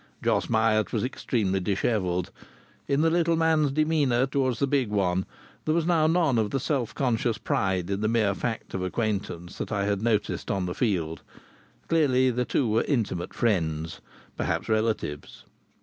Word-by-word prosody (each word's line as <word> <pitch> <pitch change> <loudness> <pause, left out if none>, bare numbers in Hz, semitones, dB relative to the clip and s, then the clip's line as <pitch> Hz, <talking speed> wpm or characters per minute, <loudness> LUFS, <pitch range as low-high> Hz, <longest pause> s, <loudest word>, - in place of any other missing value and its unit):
Jos - - +1
Myatt 110 -1 +2
was 110 - -1
extremely 110 -6 -1
dishevelled. 95 -1 -1 0.6
In 140 +1 +2
the 165 0 +3
little 170 0 +2
man's 160 -3 +2
demeanour 145 -4 +2
towards 130 -2 0
the 140 - +2
big 135 -4 +1
one 95 -3 0 0.4
there 155 - +1
was 170 -2 +1
now 165 -3 +3
none 160 -7 +2
of 105 -2 0
the 135 - -1
self 130 -3 -2
conscious 120 -3 0
pride 95 -5 0
in 100 +1 -1
the 110 - +1
mere 110 -3 +2
fact 115 +3 -4
of 95 - -2
acquaintance 95 -3 -3
that - - -4
I 100 -2 0
had 100 -1 0
noticed 110 -2 0
on 95 -2 0
the 90 - -3
field. 85 - -1 0.7
Clearly 130 -5 +3
the 125 +1 -1
two 120 +2 +1
were 110 +1 +2
intimate 110 - -1
friends, 80 -8 -1 0.3
perhaps - - -2
relatives. 110 -10 -2
115 Hz, 165 wpm, -26 LUFS, 95-135 Hz, 0.7 s, the